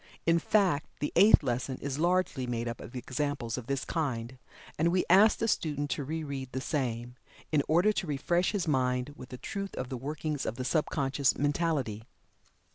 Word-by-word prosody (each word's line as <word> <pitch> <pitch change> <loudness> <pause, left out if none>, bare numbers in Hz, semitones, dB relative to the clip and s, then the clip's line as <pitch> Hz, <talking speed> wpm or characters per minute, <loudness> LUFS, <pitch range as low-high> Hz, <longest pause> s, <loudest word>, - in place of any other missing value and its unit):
In 165 0 +4
fact, 185 -6 +2
the 145 - -2
Eighth 200 -1 +7
Lesson 125 0 -2
is 140 0 -4
largely 175 -6 +1
made 120 -1 -2
up 115 - -5
of 120 - -10
examples 130 -2 -2
of 125 -2 -7
this 140 -1 -1
kind, 130 -6 -3 0.4
and 160 - +2
we 180 +2 +2
ask 205 +4 +7
the 225 - 0
student 145 -8 -1
to 145 - -1
re 160 +4 -3
read 135 -3 -5
the 130 - -1
same, 125 -4 -3 0.3
in 150 -2 +4
order 175 +7 +4
to 180 - -2
refresh 170 +5 +1
his 200 -5 -1
mind 125 -1 0
with 130 - -11
the 125 - -7
truth 195 +8 -5
of 125 - -4
the 130 - -4
workings 150 +2 -3
of - - -2
the 130 0 -4
sub 155 +2 +1
conscious 140 -1 +1
mentality. 145 -7 0
145 Hz, 195 wpm, -30 LUFS, 125-165 Hz, 0.4 s, Eighth